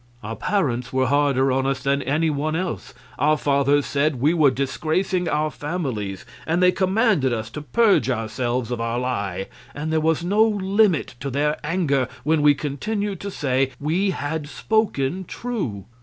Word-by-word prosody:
Our 110 +2 -5
parents 125 - -1
were 130 0 +1
harder 135 -1 +2
on 135 +1 +1
us 135 -1 -2
than 140 +1 +1
any 155 +5 +1
one 150 +2 -1
else. 180 -6 -4 0.2
Our 150 +3 +3
fathers 140 0 +2
said 145 +1 +1
we 150 +6 +3
were 155 -5 +5
disgracing 160 +7 -1
our 150 +1 0
families, 130 - -4 0.2
and 165 +2 +1
they 180 - +6
commanded 190 - +2
us 110 -1 -3
to 150 - -6
purge 200 - +3
ourselves 120 +1 -2
of 120 -2 -2
our 115 +1 -1
lie, 100 -7 -2 0.3
and 155 +2 -3
there 160 - +2
was 160 +1 +1
no 200 +5 +2
limit 200 - +2
to 140 - -4
their 150 +3 0
anger 150 -5 +1 0.2
when 155 0 +2
we 145 0 +5
continued 200 +8 -3
to 200 - -5
say 135 -6 0
we 170 +7 +1
had 150 -3 -3
spoken 190 -5 0
true. 175 - -4
145 Hz, 170 wpm, -23 LUFS, 130-175 Hz, 0.3 s, they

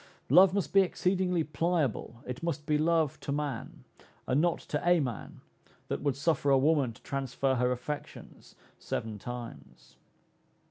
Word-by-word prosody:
Love 185 0 +8
must 200 -1 -2
be 195 - +7
exceedingly 180 -2 +1
pliable, 155 -7 -1
it 125 0 -6
must 160 -3 -3
be 150 - +1
love 160 -1 +1
to - - -5
man, 145 -4 -4 0.4
and 130 +4 +2
not 170 0 +2
to 150 - -4
a 175 0 +4
man, 125 -7 -5 0.5
that - - -2
would 140 -2 0
suffer 145 0 +1
a 135 - +6
woman 140 -2 +2
to 115 - -18
transfer 135 -1 -1
her 125 0 +1
affections 135 +4 -7 0.2
seven 110 -2 -4
times. 120 +1 -9
145 Hz, 150 wpm, -30 LUFS, 130-170 Hz, 0.5 s, Love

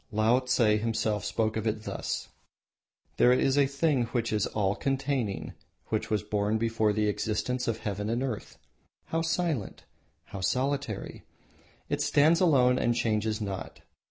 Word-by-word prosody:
Laotse 125 +4 +2 0.2
himself 110 -2 -1
spoke 110 +1 -1
of 110 0 -2
it 110 0 -2
thus: - - -4 0.9
"There 125 - +6
is 130 +1 +3
a 140 -1 +4
thing 140 -2 +1
which 115 -1 -2
is 105 -2 +1
all 100 -2 0
containing, 135 -5 -2 0.4
which - - -1
was 105 -3 0
born 105 +1 0
before 115 -1 +1
the 105 0 +1
existence 105 +4 -1
of 115 -1 0
Heaven 105 -1 -3
and 120 +3 0
Earth. 125 -6 -5 0.5
How 165 - 0
silent! 165 - -2 0.4
How 95 - -8
solitary! 130 0 -2 0.6
It - - -1
stands 155 +4 +4
alone 130 -8 +4
and 120 0 +1
changes 110 -1 0
not. 100 -3 -5
115 Hz, 145 wpm, -28 LUFS, 105-135 Hz, 0.9 s, There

